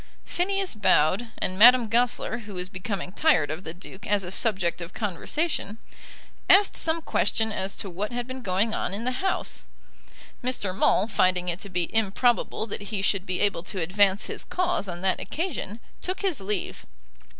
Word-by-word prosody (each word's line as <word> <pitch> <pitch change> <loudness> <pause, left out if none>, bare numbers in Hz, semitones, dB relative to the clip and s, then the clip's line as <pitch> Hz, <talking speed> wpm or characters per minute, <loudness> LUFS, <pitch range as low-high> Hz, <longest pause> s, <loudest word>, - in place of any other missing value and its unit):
Phineas 390 +1 0
bowed, 200 +1 +3
and 185 +1 -1
Madame 245 +1 +8
Goesler, 235 0 +1
who 205 -2 -8
was 180 0 -3
becoming 185 -1 -4
tired 210 - +3
of 160 +4 -5
the 160 - -5
Duke 185 +2 -10
as 205 -1 +1
a 175 - -6
subject 185 -6 0
of 170 +1 -8
conversation, 220 - -2 0.7
asked 400 +1 +6
some 325 0 0
question 220 -6 +1
as 195 -1 -3
to - - -4
what 195 +4 -4
had 245 0 -3
been 255 +1 -7
going 200 +1 +1
on 190 - -1
in 215 - -4
the 255 +1 -2
House. 385 - -1 0.8
Mr. 225 -7 -1
Maule, 200 - +3
finding 185 -4 +2
it 175 +1 -2
to 200 - -7
be 180 -2 -2
improbable 225 +2 +1
that 205 -2 -6
he 205 -3 -2
should 195 0 0
be 185 0 -1
able 200 -4 +1
to 185 +2 -5
advance 190 +3 +2
his - - -5
cause 360 - -1
on 175 -1 -5
that 190 0 +1
occasion, 295 - -4 0.2
took 370 +1 -3
his 370 - -1
leave. 195 -1 -4
205 Hz, 180 wpm, -26 LUFS, 185-245 Hz, 0.8 s, Madame